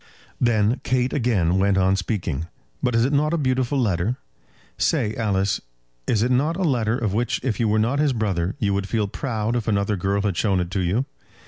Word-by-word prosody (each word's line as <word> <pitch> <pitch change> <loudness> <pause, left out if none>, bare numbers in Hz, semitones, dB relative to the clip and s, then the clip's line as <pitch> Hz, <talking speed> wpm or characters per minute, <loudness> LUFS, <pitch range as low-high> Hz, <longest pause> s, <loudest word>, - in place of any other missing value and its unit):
Then 115 0 +2
Kate 125 +1 0
again 95 - +1
went 100 0 +2
on 95 0 +3
speaking. 90 - -2 0.3
"But 125 -2 +1
is 115 +1 +3
it 140 - 0
not 150 +3 +2
a - - 0
beautiful 130 -1 0
letter? 105 +1 0 0.6
Say, 105 - +1
Alice, 100 -3 0 0.5
is 110 -1 +2
it 125 - +1
not 150 +7 +1
a 190 - -1
letter 120 -7 +1
of 110 -6 -1
which 120 +3 0
if 120 -6 -1
you 115 - +2
were 110 +5 +1
his 150 -1 +2
brother 100 -6 -1
you 100 -2 0
would 100 0 -2
feel 105 0 0
proud 115 0 -2
if 115 -3 -2
another 100 -1 +1
girl 100 +2 0
had 100 -4 0
shown 95 -1 +1
it 90 0 -3
to 95 - -1
you? 95 +9 0
110 Hz, 205 wpm, -23 LUFS, 100-125 Hz, 0.6 s, on